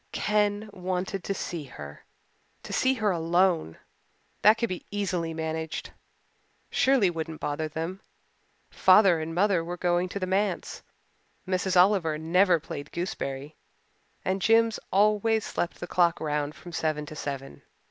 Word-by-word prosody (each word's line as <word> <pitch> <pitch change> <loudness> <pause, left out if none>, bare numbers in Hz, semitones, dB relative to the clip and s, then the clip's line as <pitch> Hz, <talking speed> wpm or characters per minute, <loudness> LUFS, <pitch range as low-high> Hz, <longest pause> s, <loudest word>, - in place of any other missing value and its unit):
Ken 210 0 0
wanted 185 0 -3
to 195 - -1
see 170 -5 -5
her 75 - -10 0.6
to - - -7
see 260 +1 +2
her 215 -4 +1
alone. 170 - +1 0.6
That 215 +2 +6
could 235 0 -1
be 185 - -5
easily 185 -5 -2
managed. 160 0 -4 0.8
Shirley 255 -9 +3
wouldn't 160 -1 -5
bother 150 +2 -2
them, 165 +5 -5 0.7
father 185 -3 +5
and 160 +1 -5
mother 190 -2 +2
were 175 +1 -5
going 175 +1 +1
to 200 - -4
the 185 - -1
Manse, 190 0 -1 0.6
Miss 185 0 0
Oliver 180 -4 +4
never 175 +3 +3
played 145 -1 -8
gooseberry, 150 -6 -4 0.7
and 190 +1 0
Jims 225 +1 +3
always 215 +2 +3
slept 175 - -3
the - - -4
clock 175 -1 +2
round 150 -1 -2
from 175 - -11
seven 155 -2 -1
to 155 - -9
seven. 140 -2 -6
180 Hz, 140 wpm, -27 LUFS, 160-200 Hz, 0.8 s, That